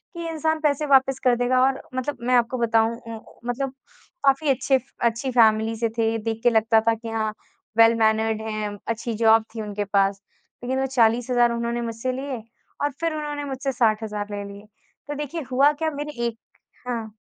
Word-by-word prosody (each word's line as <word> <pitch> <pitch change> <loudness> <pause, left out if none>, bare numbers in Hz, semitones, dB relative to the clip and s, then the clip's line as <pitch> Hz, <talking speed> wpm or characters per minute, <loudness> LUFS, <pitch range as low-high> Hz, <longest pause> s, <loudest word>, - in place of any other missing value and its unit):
कि 335 -1 -4
इंसान 315 0 0
पैसे 300 -1 +1
वापस 270 -1 +4
कर 250 -2 +4
देगा। 250 +1 +2
और 270 - -2
मतलब 255 +1 -2
मैं 250 - +4
आपको 240 +1 +2
बताऊँ 230 -1 +2
उम, 230 -2 -8 0.3
मतलब 265 +2 -2 0.5
काफ़ी 275 +2 +3
अच्छे 265 0 +2 0.3
अच्छी 235 +3 -4
फैमिली 225 -1 +4
से 230 -1 +1
थे। 225 0 +1
देख 225 -1 -2
के 240 - +6
लगता 225 0 +4
था 230 - +5
कि 225 0 -8
हाँ 220 -1 -1 0.5
वेल 230 0 +7
मैनर्ड 220 0 +2
हैं 210 -1 -3
अच्छी 230 0 -2
जॉब 225 0 +6
थी 225 - -3
उनके 205 -1 -3
पास। 195 0 +1 0.4
लेकिन 260 +2 -1
वो 270 - +1
40,000 240 +1 +3
उन्होंने 235 0 -2
मुझसे 230 +2 -3
लिए, 260 -3 -5 0.4
और 290 - +1
फिर 330 -1 0
उन्होंने 295 -1 -4
मुझसे 270 0 -3
60,000 215 -3 0
ले 205 0 -4
लिए। 200 +1 -12 0.4
तो 295 - -4
देखिए 295 +3 -4
हुआ 280 +3 +5
क्या 315 - +1
मेरी 295 -5 -4
एक 230 -1 -6 0.5
हाँ। 230 -3 -3
235 Hz, 185 wpm, -24 LUFS, 225-270 Hz, 0.5 s, वेल